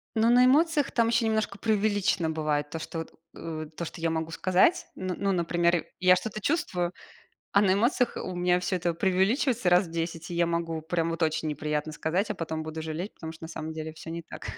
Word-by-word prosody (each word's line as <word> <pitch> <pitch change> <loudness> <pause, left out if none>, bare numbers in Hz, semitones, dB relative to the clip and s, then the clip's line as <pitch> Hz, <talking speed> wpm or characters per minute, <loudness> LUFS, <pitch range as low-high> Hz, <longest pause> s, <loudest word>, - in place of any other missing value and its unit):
Ну, 225 +1 +4
на 245 +1 +6
эмоциях 295 +2 +3
там 230 -1 +2
ещё 235 0 +2
немножко 220 -2 0
преувеличено 205 -5 +1
бывает, 150 -2 -1
то, 160 - -5
что 165 - -5
вот, 160 - -7 0.2
э, 155 -1 -5
то, 170 - -3
что 165 - -8
я 165 - +1
могу 160 0 -2
сказать. 185 - +3
Н 185 -1 -3
ну, 200 0 +1
например, 170 -1 +1
я 180 0 +6
что-то 215 +4 -4
чувствую, 180 - 0 0.6
а 200 - +5
на 190 -2 +4
эмоциях 240 +4 +1
у 185 - -4
меня 180 0 +2
всё 185 +1 -1
это 175 -1 -1
преувеличивается 195 - +2
раз 180 +2 +5
в - - -12
10, 165 0 -4
и - - -3
я 170 0 +2
могу 165 -1 -2
прям 165 +1 -1
вот 165 +1 -3
очень 160 0 0
неприятно 150 +1 -2
сказать, 170 +7 -1
а - - 0
потом 160 -1 -4
буду 160 0 -6
жалеть, 160 +6 -4
потому 160 -1 -7
что 165 0 -11
на - - -7
самом 160 -1 -5
деле 160 0 -5
всё 160 +1 -9
не 170 +1 -5
так. 165 - -9
175 Hz, 220 wpm, -28 LUFS, 160-200 Hz, 0.6 s, на